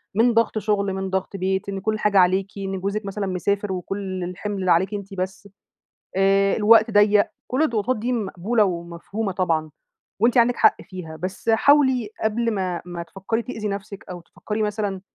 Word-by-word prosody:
من 235 +2 +4
ضغط 230 -1 +2
شُغل، 200 -2 0
من 190 0 -3
ضغط 190 +1 -2
بيت، 190 +1 -1
إن 195 -1 -3
كُلّ 215 +2 -1
حاجة 210 -2 +2
عليكِ، 185 +2 +3
إن 195 -1 -3
جوزِك 200 +2 -2
مثلًا 200 0 -3
مسافر 200 +2 -1
وكُلّ 185 0 -4
الحِمْل 185 +1 -3
عليكِ 190 +5 +3
أنتِ 200 -1 -6
بس، 190 +2 -5 0.7
آآ 195 +1 +3
الوقت 220 +1 +5
ضيَّق، 205 0 +4 0.2
كُلّ 260 +5 0
الضغوطات 235 -4 0
دي 240 +4 -2
مقبولة 215 0 0
ومفهومة 180 +3 -3
طبعًا، 165 -4 -1 0.5
وأنتِ 240 +2 +4
عندِك 240 +1 +4
حق - - +4
فيها، 180 -4 -9
بس 190 +4 -4
حاولي 260 -1 +4
قبل 230 +2 +1
ما 185 -3 -2
ما 175 -1 -6
تفكري 195 +6 -3
تأذي 220 -4 -5
نفسِك، 200 +1 -6
أو 175 -1 -7
تفكري 215 +5 -4
مثلًا 205 -2 -2
200 Hz, 170 wpm, -23 LUFS, 190-215 Hz, 0.7 s, الوقت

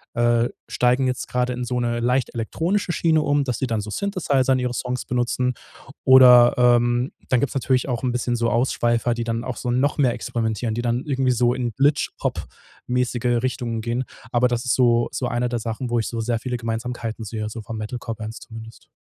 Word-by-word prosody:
äh, 120 0 +3 0.2
steigen 125 +2 +2
jetzt 125 -1 -3
gerade 125 0 -1
in 125 0 -4
so 125 0 -2
'ne 120 0 -1
leicht 125 +2 0
elektronische 170 - -1
Schiene 160 -2 +2
um, 145 -1 +1
dass 125 -5 -2
sie 130 - -1
dann 115 -3 -1
so 105 - -7
Synthesizer 140 - 0
in 130 - +1
ihre 125 -1 -2
Songs 125 0 -3
benutzen. 125 +1 0 0.5
Oder, 125 -2 +8
ähm, 120 0 +3 0.2
dann 125 - +3
gibt's 140 - -2
natürlich 130 0 +1
auch 120 -1 -2
'n 125 - +1
bisschen 125 0 -1
so 115 0 +1
Ausschweifer, 120 -1 +1
die 120 0 -3
dann 115 0 -2
auch 125 -1 -5
so 125 - -4
noch 130 +4 +1
mehr 130 -5 +3
experimentieren. 110 -1 -2
Die 120 - -2
dann 120 +1 0
irgendwie 135 -3 +1
so 120 0 +2
in 125 -2 -2
Glitch-Hop-mäßige 125 -3 -1
Richtungen 120 -3 -2
gehen. 120 +3 -2 0.3
Aber 120 +1 +3
das 120 -1 -2
ist 125 - +2
so 120 -2 +3
so 125 - -2
einer 120 +1 -1
der 120 0 -2
Sachen, 115 +3 -4
wo 120 0 +1
ich 110 - -2
so 115 -1 -3
sehr 115 0 -1
viele 125 +1 -3
Gemeinsamkeiten 115 -1 -4
sehe, 110 0 -4
so 115 +1 -7
von 115 +2 -7
Metal-Core-Bands 110 0 -6
zumindest. 115 -2 -12
120 Hz, 200 wpm, -22 LUFS, 115-125 Hz, 0.5 s, Oder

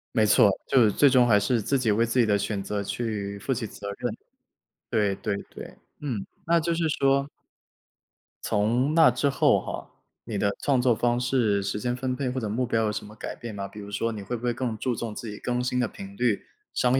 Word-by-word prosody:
没 110 -2 +4
错， 105 - +6 0.2
就 130 -3 +5
是 105 - +4
最 145 +7 +5
终 125 -2 +5
还 105 -3 +5
是 120 +3 +1
自 135 +6 +1
己 115 -4 +2
为 115 +3 +3
自 115 +2 0
己 120 - +5
的 105 -2 +3
选 100 0 -2
择 100 +1 -3
去 100 -2 -3
负 115 - -3
起 120 -3 -1
责 100 - -8
任。 120 -3 -3 0.7
对 105 -3 +1
对 105 -1 -2 0.2
对， - - -9 0.2
嗯， 125 -9 -3 0.2
那 170 0 +4
就 170 +1 0
是 165 -1 0
说 140 -1 +2 1.2
从 120 +8 +1
那 160 -3 +7
之 125 +4 +1
后 140 - +3
哈， - - -6 0.4
你 110 -3 -3
的 100 0 +1
创 135 -3 +2
作 125 -1 +4
方 120 +2 +1
式、 120 -5 +1
时 100 - -2
间 125 +3 -1
分 130 0 -2
配 130 0 -2
或 130 +1 -3
者 110 - -2
目 120 +5 0
标 115 -2 +1
有 - - 0
什 - - -5
么 105 +1 -12
改 - - -6
变 115 -3 -7
吗？ 100 -1 -5
比 105 - -11
如 100 0 -8
说 115 +3 -1
你 110 -2 -6
会 105 +5 -4
不 120 - -8
会 120 -1 +1
更 120 -2 -3
注 125 +3 -1
重 115 -1 -5
自 115 - -6
己 105 - -7
更 125 0 -1
新 125 0 0
的 125 - +2
频 100 -1 -10
率、 120 -4 +1 0.3
商 125 +1 +3
120 Hz, 255 characters per minute, -26 LUFS, 105-125 Hz, 1.2 s, 那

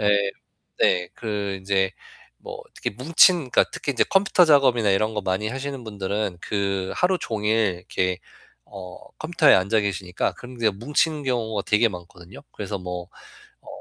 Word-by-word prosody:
예. 105 - 0 0.8
네, 90 0 +3
그 105 -3 -3
인제 95 0 0 0.5
뭐 - - -9
특히 - - -3
뭉친 165 - +5
그니까 - - +4
특히 140 - -3
인제 - - +2
컴퓨터 195 -2 +4
작업이나 130 -8 +4
이런 110 +3 +1
거 105 - -1
많이 95 +3 -1
하시는 135 0 -5
분들은 100 -2 -3
그 100 -2 -2
하루 180 0 +1
종일 105 -3 0
이렇게 90 0 -2 0.5
어 95 -3 -10 0.2
컴퓨터에 155 -2 +4
앉아 100 +4 +2
계시니까 95 -3 -2
그런 125 0 -12
게 115 -2 +2
뭉치는 150 - -1
경우가 110 -5 -1
되게 105 +3 +4
많거든요. 90 -1 -11
그래서 100 -1 -5
뭐 90 -1 -6 0.6
어 - - -27
105 Hz, 320 characters per minute, -23 LUFS, 95-125 Hz, 0.8 s, 뭉친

